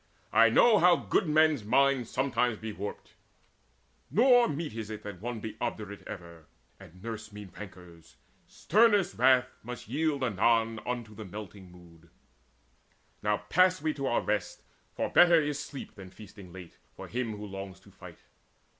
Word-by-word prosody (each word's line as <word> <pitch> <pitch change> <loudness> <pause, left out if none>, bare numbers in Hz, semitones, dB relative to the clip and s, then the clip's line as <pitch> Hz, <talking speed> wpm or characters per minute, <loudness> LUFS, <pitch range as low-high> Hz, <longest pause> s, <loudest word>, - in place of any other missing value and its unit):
I - - +6
know 225 -4 +5
how 175 +1 +6
good 170 - 0
men's 155 -5 +3
minds 130 +2 +2
sometimes 125 -3 0
be 110 0 -6
warped: 100 +1 -7 1.0
Nor 245 +1 +5
meet 150 -3 -4
it 115 - -6
is 110 - -5
that 105 -4 -8
one 120 0 -4
be 110 -1 -7
obdurate 105 -4 -4
Ever, 85 -4 -10 0.3
and 90 +3 -15
nurse 110 -1 -7
mean 105 -2 -10
rancours: 90 -4 -12 0.3
sternest 210 - +2
wrath 130 0 +4
Must 120 -1 -8
yield 145 +2 -1
anon 115 0 +1
unto 120 -3 -4
the 110 - -9
melting 100 -1 -10
mood. 85 -2 -18 1.1
Now 105 0 -1
pass 185 +4 +4
we 155 0 -1
to 140 -2 -4
our - - +1
rest; - - -3 0.3
for - - -2
better 175 -1 +6
is 145 -2 -2
sleep 140 - -8
Than 95 -2 -11
feasting 100 -1 -13
late, 90 -2 -12 0.2
for - - -9
him 115 -3 -3
who 105 - -7
longs 95 -2 -8
to - - -19
fight." - - -14
110 Hz, 160 wpm, -29 LUFS, 100-140 Hz, 1.1 s, I